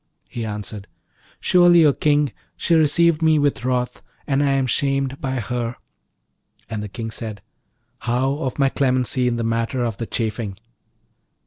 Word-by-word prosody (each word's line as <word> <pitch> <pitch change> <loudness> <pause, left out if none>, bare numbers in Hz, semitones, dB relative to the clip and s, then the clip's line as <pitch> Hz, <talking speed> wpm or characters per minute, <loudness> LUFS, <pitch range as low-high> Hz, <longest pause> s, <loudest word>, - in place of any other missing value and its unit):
He 120 - -5
answered, 105 -1 -6 0.5
'Surely, 175 -2 +5
O 145 - +5
King, 145 -3 +1 0.2
she 170 - 0
received 165 +1 +4
me 160 -1 +4
with 145 -4 +1
wrath, 125 -1 -1 0.2
and 140 -1 +1
I 140 -1 +2
am 135 -1 +1
shamed 135 0 -1
by 130 -1 -2
her.' 120 +1 -3 0.9
And 110 -2 -4
the 105 - -6
King 115 +2 -6
said, 110 -3 -6 0.6
'How 130 +4 0
of 130 -5 -3
my 135 -1 +3
clemency 130 -1 +1
in 120 - +1
the 120 - -2
matter 115 +2 -1
of 115 -3 -3
the 115 - -4
chafing?' 110 -3 -3
130 Hz, 155 wpm, -22 LUFS, 115-145 Hz, 0.9 s, Surely